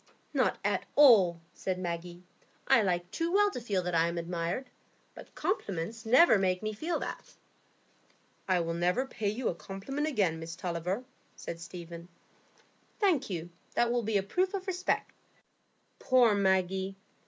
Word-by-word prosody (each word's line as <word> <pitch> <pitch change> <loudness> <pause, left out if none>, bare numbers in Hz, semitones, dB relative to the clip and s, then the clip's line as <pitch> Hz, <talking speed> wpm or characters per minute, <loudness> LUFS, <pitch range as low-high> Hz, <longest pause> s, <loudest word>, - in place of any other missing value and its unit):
"Not - - +2
at - - 0
all," 200 - +6
said 185 -1 -3
Maggie; 175 0 -5 0.4
"I 235 - +6
like 180 -3 -1
too 335 +1 -1
well 410 +2 +4
to 250 - -5
feel 200 -5 -1
that 180 0 -3
I 165 0 +3
am 170 0 -3
admired, 170 +8 -3 0.5
but - - -13
compliments 225 - -3
never 255 - +6
make 185 0 0
me 215 0 -2
feel 320 +10 -2
that." - - -7 1.1
"I 185 -2 +2
will 165 0 -2
never 180 +9 +1
pay 215 -6 -3
you 230 +4 -2
a - - +1
compliment 270 - -4
again, 195 - +1
Miss 165 +1 -7
Tulliver," 180 +5 -3 0.3
said 170 - -7
Stephen. 170 0 -9 0.9
"Thank 335 - +2
you; 175 -2 -5 0.2
that 240 0 +2
will 240 0 +1
be 220 -2 0
a 195 - 0
proof 370 - 0
of 380 -1 -4
respect." 370 -1 -1 0.9
Poor 250 -4 +4
Maggie! 190 -1 +1
195 Hz, 155 wpm, -30 LUFS, 175-250 Hz, 1.1 s, all